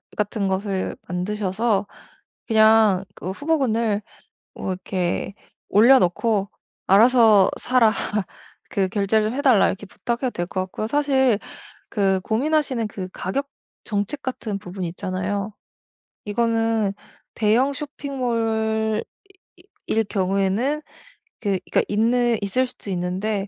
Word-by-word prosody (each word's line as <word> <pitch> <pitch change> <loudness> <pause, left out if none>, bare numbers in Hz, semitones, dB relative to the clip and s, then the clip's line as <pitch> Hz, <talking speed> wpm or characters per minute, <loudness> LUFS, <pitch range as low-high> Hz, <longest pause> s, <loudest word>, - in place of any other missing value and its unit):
같은 210 -1 -1
것을 190 0 -2
만드셔서 200 +3 -1 0.6
그냥 220 -3 +5
그 185 - -5
후보군을 230 -6 0 0.5
뭐 190 - -3
이렇게 185 +1 -2 0.4
올려놓고 210 -2 +4 0.4
"알아서 220 -1 +6
사라." 240 -3 +4 0.8
그 195 -2 +1
"결제를 215 +3 +1
해 285 - -2
달라." 250 -8 +5
이렇게 195 +1 -4
부탁해도 240 +5 -3
될 175 -4 -3
것 185 - -3
같고요. 215 +3 -4
사실 265 -6 +2 0.5
그 195 -2 +2
고민하시는 255 0 0
그 185 -2 -6
가격 275 +10 -3 0.4
정책 205 +7 -2
같은 225 -6 -4
부분이 180 -1 -5
있잖아요. 190 +4 -3 0.7
이거는 225 -1 +1 0.4
대형 230 +6 +3
쇼핑몰 225 -6 -1 0.6
이 - - -8
이 - - +1
일 225 - +3
경우에는 195 +9 0 0.6
그 200 -4 0
그러니까 - - +3
있는 235 +2 +2
있을 250 +6 +1
수도 240 -4 -11
있는데 190 +3 -2
215 Hz, 250 characters per minute, -22 LUFS, 195-240 Hz, 0.8 s, 알아서